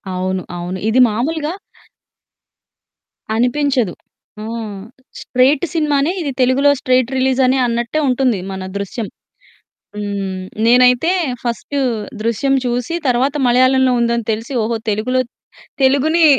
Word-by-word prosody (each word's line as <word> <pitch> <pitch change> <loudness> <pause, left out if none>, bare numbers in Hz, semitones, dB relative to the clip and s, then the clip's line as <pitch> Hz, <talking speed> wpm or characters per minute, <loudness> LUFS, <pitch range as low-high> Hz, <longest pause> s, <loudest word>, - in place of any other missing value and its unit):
అవును, 185 0 -2
అవును. 175 +2 -5
ఇది 240 +3 +3
మాములుగా 295 +9 -2 1.8
అనిపించదు. 250 -3 +1 0.5
ఆ! - - -6 0.8
స్ట్రెయిట్ 265 +4 +2
సినిమానే 295 -1 +1
ఇది. 290 -4 -2
తెలుగులో 260 +3 +4
స్ట్రెయిట్ 255 -1 +2
రిలీజ్ 260 0 +1
అనే 260 +1 +2
అన్నట్టే 235 +5 -1
ఉంటుంది 250 -4 +1
మన 190 0 -5
'దృశ్యం'. 200 +2 -4 0.9
హ్మ్. 200 -2 -3 0.2
నేనైతే 250 +7 +5 0.3
ఫస్ట్ 235 +3 -4 0.5
'దృశ్యం' 235 +5 +1
చూసి, 245 +6 -1
తరువాత 260 +4 +1
మలయాళంలో 255 +1 +4
ఉందని 235 -1 0
తెలిసి, 225 +5 -4
ఓహో! 230 +1 -1
తెలుగులో 235 +5 0 0.6
తెలుగుని 310 +5 +3
250 Hz, 105 wpm, -17 LUFS, 225-270 Hz, 1.8 s, నేనైతే